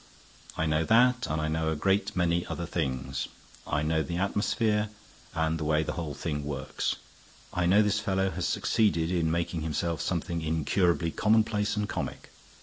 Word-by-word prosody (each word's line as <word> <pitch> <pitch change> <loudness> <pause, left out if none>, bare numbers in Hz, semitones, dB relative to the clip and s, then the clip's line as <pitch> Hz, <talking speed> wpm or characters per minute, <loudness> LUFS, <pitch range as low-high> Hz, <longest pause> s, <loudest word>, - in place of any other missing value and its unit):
"I 80 - +1
know 75 0 +2
that, 125 +3 +4
and 80 - -1
I 80 - 0
know 80 0 0
a - - 0
great 95 +6 +1
many 85 -1 +2
other 85 - -3
things. 65 -7 -2 0.4
I 75 0 0
know 80 +1 +1
the 85 +2 -3
atmosphere 105 +2 +1 0.5
and 80 0 0
the - - -2
way 75 +1 +2
the - - -3
whole 80 -4 -4
thing 75 -3 -3
works. 70 -2 -2 0.6
I 90 -1 +1
know 100 +4 +6
this 105 0 +1
fellow 95 -1 0
has - - -2
succeeded 90 -7 +1
in 85 -3 +1
making 85 0 -1
himself 80 +1 -1
something 85 -1 -2
incurably 80 +2 +1
commonplace 105 0 +2
and 105 0 0
comic. - - -5
85 Hz, 170 wpm, -29 LUFS, 80-100 Hz, 0.6 s, know